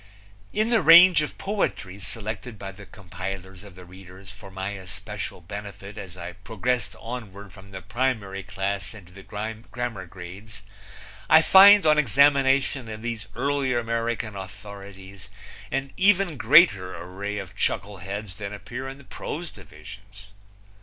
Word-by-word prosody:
In 215 +2 0
the 225 -3 +4
range 175 -1 +8
of 150 - -4
poetry 190 - -2
selected 110 +2 -5
by 95 -1 -7
the 100 +1 -13
compilers 95 -2 -8
of 100 -3 -14
the 90 -1 -12
readers 95 +1 -13
for 100 0 -12
my 95 0 -4
especial 95 -1 -7
benefit 100 +2 -8
as 95 -4 -9
I 85 0 -7
progressed 110 +2 -2
onward 105 -5 -8
from 100 -1 -14
the 95 -2 -9
primary 110 -3 -2
class 100 +1 -4
into 90 -4 -14
the 100 - -11
grammar 110 0 -5
grades 100 +4 -11 0.7
I 160 0 +8
find 200 +1 +8
on 150 -1 +5
examination 135 -1 +3
of 110 0 -7
these 115 -3 -4
earlier 135 0 0
American 115 -2 -2
authorities 95 0 -10 0.4
an 135 0 -3
even 195 -3 +3
greater 115 - +5
array 95 +4 -5
of 95 -1 -7
chuckleheads 100 -1 -3
than 100 -1 -6
appear 125 +5 -7
in 135 - -9
the 140 - -15
prose 160 +5 -6
divisions. 100 +4 -13
105 Hz, 140 wpm, -25 LUFS, 95-125 Hz, 0.7 s, range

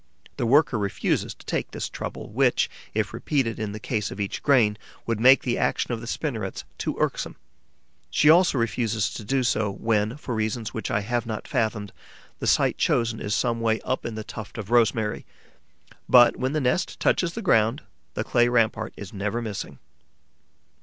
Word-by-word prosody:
The 120 - 0
worker 135 -2 +4
refuses 100 -2 -1
to - - -18
take - - -2
this - - -4
trouble, - - -6
which, - - +2 0.2
if - - -1
repeated 125 -6 -1
in 105 -2 -3
the 105 - -6
case 105 -2 -2
of - - -8
each 100 -1 -3
grain, 115 -7 +3 0.3
would 115 -2 -1
make 130 +3 +6
the 120 - -1
action - - 0
of 115 -2 -3
the 115 - -8
spinnerets 115 -8 -3 0.2
too - - -2
irksome. - - -1 0.7
She 150 - +2
also 170 -1 +6
refuses 115 -2 0
to - - -7
do 130 +5 0
so 110 -3 +1
when, 105 +4 0
for 135 -4 -5
reasons 110 +1 -2
which 110 - -4
I 100 - +1
have 120 +2 -2
not 110 -2 -5
fathomed, 110 -3 -1 0.5
the - - -3
site - - +3
chosen 115 -2 +1
is 105 +1 -1
some 115 -1 0
way 110 -1 +1
up 130 - -2
in 115 - -5
the 110 - -5
tuft 110 +1 -9
of 110 0 -6
rosemary. 110 -2 +2 0.9
But, 120 -1 +7
when 130 +2 -2
the 155 - +1
nest 130 +8 0
touches 170 -2 +1
the 230 - -5
ground, 110 - +2 0.3
the - - -1
clay 120 0 +3
rampart 110 -2 +1
is 100 -3 -9
never 105 +3 -2
missing. 105 -4 -5
115 Hz, 185 wpm, -25 LUFS, 105-125 Hz, 0.9 s, But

